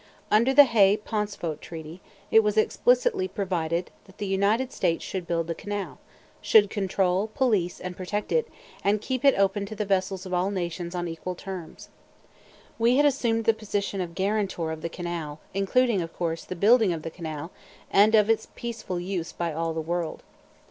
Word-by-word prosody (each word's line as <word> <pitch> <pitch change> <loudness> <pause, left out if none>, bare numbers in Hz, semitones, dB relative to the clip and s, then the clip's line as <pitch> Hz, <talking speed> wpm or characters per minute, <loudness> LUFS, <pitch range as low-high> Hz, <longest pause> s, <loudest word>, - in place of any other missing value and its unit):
Under 230 +5 +4
the 290 +2 +9
Hay 210 -6 +4
Pauncefote 210 -7 -3
Treaty, 165 +2 -9 0.3
it 225 - +8
was 210 0 -1
explicitly 475 - +2
provided 175 - -2
that 190 - -19
the 205 - -3
United 205 +7 +1
States 165 - 0
should 185 -3 -5
build 165 -1 0
the 165 - -3
canal, 205 +3 -5 0.4
should 205 -2 +5
control, 195 -1 0
police 210 -10 +1
and 180 0 -6
protect 205 +3 -4
it, 475 - +2 0.4
and 205 +1 +2
keep 255 +4 -3
it 275 -1 +5
open 200 +1 +1
to 215 - -7
the 210 0 -2
vessels 190 -1 -1
of 185 - -6
all 180 +2 +1
nations 175 -2 -4
on 175 0 -2
equal 170 +2 -5
terms. 180 -3 -8 0.9
We 235 +3 +4
had 290 - +5
assumed 235 -5 +1
the 225 - +5
position 205 -2 -3
of 170 -2 -5
guarantor 190 -4 -1
of 160 0 -6
the 170 - -3
canal, 165 -4 -5
including, 200 +2 +2
of 165 0 -6
course, 165 -1 -3
the 185 - -5
building 215 +2 +5
of 160 -2 -6
the 165 - -5
canal, 160 -1 -6 0.4
and 210 +3 +6
of 210 -1 +5
its 225 -1 +1
peaceful 225 -7 -4
use 175 -2 -3
by 170 -2 -3
all 165 +1 -1
the 160 0 -3
world. 170 0 -3
195 Hz, 185 wpm, -26 LUFS, 170-215 Hz, 0.9 s, the